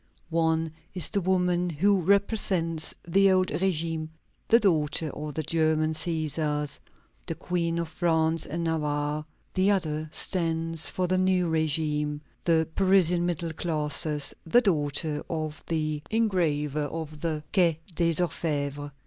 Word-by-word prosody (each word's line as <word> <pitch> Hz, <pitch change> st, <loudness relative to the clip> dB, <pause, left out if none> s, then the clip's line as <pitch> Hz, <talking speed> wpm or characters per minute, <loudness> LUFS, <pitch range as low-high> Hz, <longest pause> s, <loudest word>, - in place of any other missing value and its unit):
One 160 Hz, -1 st, +1 dB, 0.2 s
is 180 Hz, -5 st, +1 dB
the 200 Hz, -, 0 dB
woman 180 Hz, -1 st, +1 dB
who 190 Hz, +5 st, +2 dB
represents 185 Hz, -4 st, +1 dB
the 195 Hz, +3 st, +4 dB
old 185 Hz, 0 st, +2 dB
régime 165 Hz, -3 st, -1 dB, 0.4 s
the 230 Hz, -, +6 dB
daughter 160 Hz, -6 st, +1 dB
of 150 Hz, 0 st, -7 dB
the 155 Hz, -, -2 dB
German 155 Hz, 0 st, +1 dB
Cæsars, 155 Hz, -2 st, -1 dB, 0.5 s
the -, -, -2 dB
Queen 170 Hz, -2 st, -2 dB
of 170 Hz, -1 st, -2 dB
France 160 Hz, -1 st, 0 dB
and 165 Hz, +3 st, -3 dB
Navarre; 150 Hz, -2 st, -1 dB, 0.3 s
the 190 Hz, +1 st, +2 dB
other 155 Hz, -6 st, 0 dB
stands 165 Hz, -3 st, 0 dB
for 185 Hz, -, -1 dB
the 185 Hz, +1 st, +1 dB
new 185 Hz, -2 st, +2 dB
régime, 150 Hz, -2 st, 0 dB, 0.3 s
the 160 Hz, -2 st, +3 dB
Parisian 180 Hz, -3 st, +4 dB
middle 170 Hz, -1 st, -2 dB
classes 150 Hz, -2 st, +1 dB
the 240 Hz, +9 st, +4 dB
daughter 150 Hz, -, 0 dB
of 155 Hz, -2 st, -4 dB
the 155 Hz, -2 st, -1 dB
engraver 155 Hz, -9 st, 0 dB
of 155 Hz, -1 st, -6 dB
the 155 Hz, -3 st, -2 dB
Quai 170 Hz, -5 st, +4 dB, 0.2 s
des 165 Hz, 0 st, +1 dB
Orfèvres. 145 Hz, -4 st, -1 dB
160 Hz, 130 wpm, -27 LUFS, 155-180 Hz, 0.5 s, the